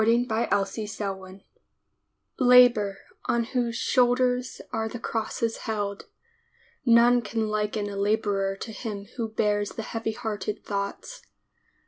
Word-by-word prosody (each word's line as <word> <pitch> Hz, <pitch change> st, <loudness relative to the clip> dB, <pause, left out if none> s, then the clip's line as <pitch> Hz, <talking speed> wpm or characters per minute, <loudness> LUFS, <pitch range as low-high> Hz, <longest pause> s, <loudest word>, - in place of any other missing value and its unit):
DAY 235 Hz, +2 st, +3 dB
DREAMS 200 Hz, -3 st, -2 dB, 1.0 s
LABOR 245 Hz, -6 st, +6 dB, 0.3 s
On 235 Hz, 0 st, +1 dB
whose 235 Hz, -1 st, -1 dB
shoulders 250 Hz, 0 st, +2 dB
are 220 Hz, 0 st, -1 dB
the 240 Hz, -, -6 dB
crosses 225 Hz, 0 st, -2 dB
held, 205 Hz, -2 st, -3 dB, 0.8 s
None 240 Hz, 0 st, +6 dB
can 220 Hz, 0 st, -2 dB
liken 210 Hz, 0 st, -1 dB
a 200 Hz, -, -5 dB
laborer 200 Hz, -1 st, 0 dB
to 220 Hz, +3 st, -7 dB
him 210 Hz, -3 st, -6 dB
who 230 Hz, -2 st, -2 dB
bears 210 Hz, -1 st, 0 dB
the 225 Hz, -, -5 dB
heavy 225 Hz, 0 st, -3 dB
hearted 215 Hz, -3 st, -4 dB
thoughts. 200 Hz, -, -4 dB
220 Hz, 115 wpm, -26 LUFS, 205-235 Hz, 1.0 s, LABOR